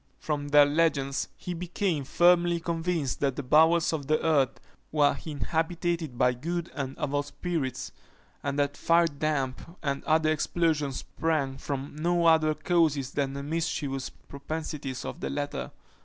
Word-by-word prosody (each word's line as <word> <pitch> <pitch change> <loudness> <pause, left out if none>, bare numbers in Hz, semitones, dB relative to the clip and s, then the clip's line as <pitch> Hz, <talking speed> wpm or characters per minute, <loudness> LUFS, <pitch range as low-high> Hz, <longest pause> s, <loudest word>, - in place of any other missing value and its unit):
From 145 -2 -3
their 145 0 +7
legends, 145 -2 +1
he 180 - -5
became 175 -3 -2
firmly 175 +3 +4
convinced 165 -4 -1
that 135 -2 0
the 145 - -4
bowels 160 +5 +4
of 145 -4 -3
the 155 +1 +3
earth 140 -5 +2 0.3
were 150 -2 +3
inhabited 160 -1 -2
by 125 0 +3
good 170 +7 -4
and 135 -2 -4
evil 145 0 0
spirits, 140 -4 -3 0.5
and 140 0 -2
that 145 0 +1
firedamp 155 -2 0
and 140 -1 -1
other 155 0 +3
explosions 155 -3 0
sprang 140 -5 -2
from 140 0 -4
no 170 +2 +1
other 160 -2 +5
causes 155 -8 +1
than 140 -2 -1
the 140 0 -5
mischievous 145 -3 -2
propensities 140 -2 -6
of - - -6
the - - -3
latter. 145 - -3
150 Hz, 140 wpm, -28 LUFS, 140-165 Hz, 0.5 s, their